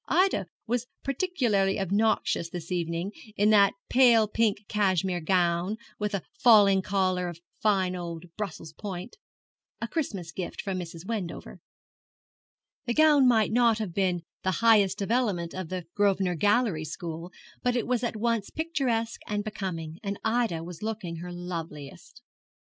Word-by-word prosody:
Ida 360 Hz, -, +2 dB, 0.2 s
was 245 Hz, +1 st, -1 dB, 0.2 s
particularly 245 Hz, -, +1 dB
obnoxious 195 Hz, -3 st, +1 dB
this 170 Hz, 0 st, -7 dB
evening, 170 Hz, +2 st, -2 dB, 0.2 s
in 210 Hz, +2 st, +3 dB
that 200 Hz, -2 st, +5 dB
pale 235 Hz, -4 st, +5 dB
pink 210 Hz, -1 st, 0 dB
cashmere 190 Hz, -3 st, +1 dB
gown, 175 Hz, +3 st, +1 dB, 0.2 s
with 210 Hz, -1 st, -1 dB
a 195 Hz, -, -3 dB, 0.2 s
falling 205 Hz, -5 st, +6 dB
collar 185 Hz, -2 st, 0 dB
of 170 Hz, -1 st, -7 dB, 0.2 s
fine 190 Hz, -4 st, +2 dB
old 170 Hz, -1 st, -6 dB
Brussels 165 Hz, -6 st, -6 dB
point, 190 Hz, -, -7 dB, 0.6 s
a -, -, -3 dB
Christmas 200 Hz, -, -3 dB
gift 180 Hz, 0 st, -6 dB
from 195 Hz, -3 st, -2 dB
Mrs. 170 Hz, -1 st, -8 dB
Wendover. 200 Hz, -6 st, -5 dB, 1.3 s
The 240 Hz, -, 0 dB
gown 300 Hz, -4 st, +6 dB
might 220 Hz, -4 st, +4 dB
not 235 Hz, -1 st, +4 dB, 0.2 s
be 180 Hz, -3 st, 0 dB, 0.2 s
the 185 Hz, -, 0 dB
highest 210 Hz, -4 st, +4 dB
development 200 Hz, -5 st, 0 dB
of 185 Hz, -3 st, -5 dB
the 185 Hz, -2 st, -4 dB
Grosvenor 195 Hz, -3 st, +2 dB
Gallery 205 Hz, -1 st, +2 dB
school, 165 Hz, +2 st, -6 dB, 0.3 s
but 250 Hz, 0 st, +1 dB
it 240 Hz, -, 0 dB
was 250 Hz, 0 st, 0 dB
at 235 Hz, -, -1 dB
once 225 Hz, -1 st, 0 dB
picturesque 265 Hz, -8 st, -1 dB
and 205 Hz, -1 st, -1 dB
becoming, 170 Hz, -6 st, -5 dB
and 200 Hz, -2 st, -3 dB
Ida 220 Hz, -8 st, 0 dB
was 175 Hz, -1 st, -9 dB
looking 210 Hz, -6 st, -4 dB
her 175 Hz, +2 st, -7 dB
loveliest. 175 Hz, -, -7 dB
200 Hz, 145 wpm, -28 LUFS, 175-225 Hz, 1.3 s, falling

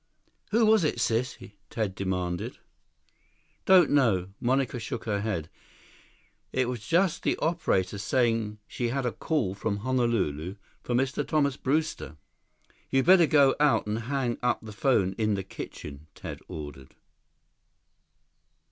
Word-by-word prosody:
"Who 225 Hz, +1 st, +3 dB
was 215 Hz, -3 st, +5 dB
it, 150 Hz, -6 st, 0 dB
sis?" 120 Hz, +2 st, 0 dB, 0.3 s
Ted 110 Hz, -4 st, -2 dB
demanded. 90 Hz, -2 st, -3 dB, 1.1 s
"Don't 190 Hz, -2 st, +6 dB
know." 110 Hz, -11 st, +3 dB
Monica 130 Hz, 0 st, 0 dB
shook 110 Hz, +1 st, -5 dB
her 105 Hz, -3 st, -1 dB
head. 100 Hz, -8 st, -2 dB, 1.0 s
"It 130 Hz, -1 st, +1 dB
was 120 Hz, -3 st, -5 dB
just 180 Hz, +1 st, +2 dB
the -, -, 0 dB
operator 105 Hz, -, 0 dB
saying 115 Hz, -1 st, 0 dB
she 120 Hz, -, -2 dB
had 130 Hz, +2 st, -1 dB
a 120 Hz, -, +1 dB
call 125 Hz, -, -1 dB
from 100 Hz, +1 st, -2 dB
Honolulu 100 Hz, -, 0 dB, 0.3 s
for 120 Hz, -, -2 dB
Mr. 135 Hz, +3 st, 0 dB
Thomas 140 Hz, -2 st, +1 dB
Brewster." 145 Hz, -, -2 dB, 0.7 s
"You'd 135 Hz, -1 st, +2 dB
better 175 Hz, -2 st, +7 dB
go 140 Hz, -3 st, +5 dB
out 150 Hz, -1 st, +3 dB
and 105 Hz, +1 st, -2 dB
hang 130 Hz, -4 st, -1 dB
up 125 Hz, -1 st, +1 dB
the 110 Hz, -1 st, -9 dB
phone 105 Hz, -6 st, +2 dB
in 110 Hz, -2 st, +2 dB
the 95 Hz, -, -3 dB
kitchen," 75 Hz, -3 st, -9 dB
Ted -, -, -7 dB
ordered. 75 Hz, -4 st, -9 dB
120 Hz, 135 wpm, -27 LUFS, 100-140 Hz, 1.1 s, better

